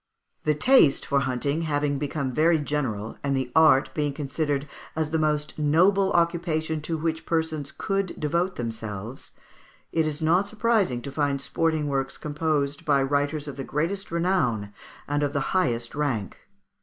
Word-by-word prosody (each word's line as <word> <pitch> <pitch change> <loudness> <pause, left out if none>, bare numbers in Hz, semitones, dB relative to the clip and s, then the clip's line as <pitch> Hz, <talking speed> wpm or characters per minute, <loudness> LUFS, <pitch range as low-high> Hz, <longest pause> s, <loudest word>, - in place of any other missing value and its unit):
"] - - -49
The 150 -1 +3
taste 155 - +5
for 140 - +2
hunting 140 +4 -1
having 145 -3 0
become 140 -2 -2
very 160 +3 +4
general, 130 -8 -3
and 140 -1 +1
the 130 -2 -2
art 155 -4 +5
being 150 -2 -1
considered 145 0 -2 0.3
as 155 -1 -1
the 160 - +1
most 150 0 -1
noble 185 +6 +3
occupation 165 -2 0
to 160 +2 -2
which 160 +1 -2
persons 160 -3 -2
could 195 -2 -2
devote 170 +5 0
themselves, 110 0 -6 0.6
it 160 -1 +1
is 150 -1 -2
not 175 +5 +2
surprising 215 - +1
to 140 - -6
find 140 -1 0
sporting 160 +2 0
works 135 -1 -1
composed 150 -2 -1
by 140 -2 +3
writers 145 +2 0
of 140 -2 -7
the 135 - -4
greatest 170 +9 -2
renown 150 - 0 0.3
and 145 0 0
of 145 -1 0
the 140 - +1
highest 120 -11 0
rank. 135 -10 -2
150 Hz, 160 wpm, -25 LUFS, 140-160 Hz, 0.6 s, taste